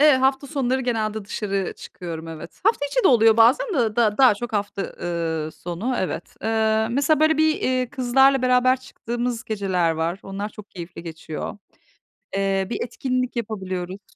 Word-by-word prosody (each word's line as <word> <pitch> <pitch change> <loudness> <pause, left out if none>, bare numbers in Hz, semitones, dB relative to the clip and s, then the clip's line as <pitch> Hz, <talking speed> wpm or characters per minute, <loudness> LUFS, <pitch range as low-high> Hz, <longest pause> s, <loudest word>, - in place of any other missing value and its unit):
Eee, 300 0 +7
hafta 265 +1 +1
sonları, 265 -3 0
genelde, 220 -4 -1
dışarı 195 -2 -2
çıkıyorum, 165 -2 -8
evet. 160 -1 -9
Hafta 430 -10 +3
içi - - 0
de - - +7
oluyor, 225 -3 +5
bazen 245 - +5
de 230 -5 +1
d 215 -2 +2
daha 260 -6 +7
çok, 240 +3 -6
hafta, 200 -1 -2 0.2
ııı, 165 -2 -2
sonu, 180 +9 -4
evet. 180 -2 -4
Eee, 220 0 +2
mesela, 285 +4 +2
böyle, 315 0 +4
bir, 315 0 +4
iii, 255 -1 0
kızlarla 265 0 +3
beraber 255 +1 +3
çıktığımız 240 -2 -4
geceler 190 -6 0
var. 165 +3 -1
Onlar, 195 +2 -5
çok 210 -1 -13
keyifli 170 -1 -8
geçiyor. 165 +2 -6 0.8
Eee, 195 -1 +1
bir - - -2
etkinlik 255 +1 -2
yapabiliyoruz. 190 -4 -5
220 Hz, 160 wpm, -23 LUFS, 190-255 Hz, 0.8 s, Eee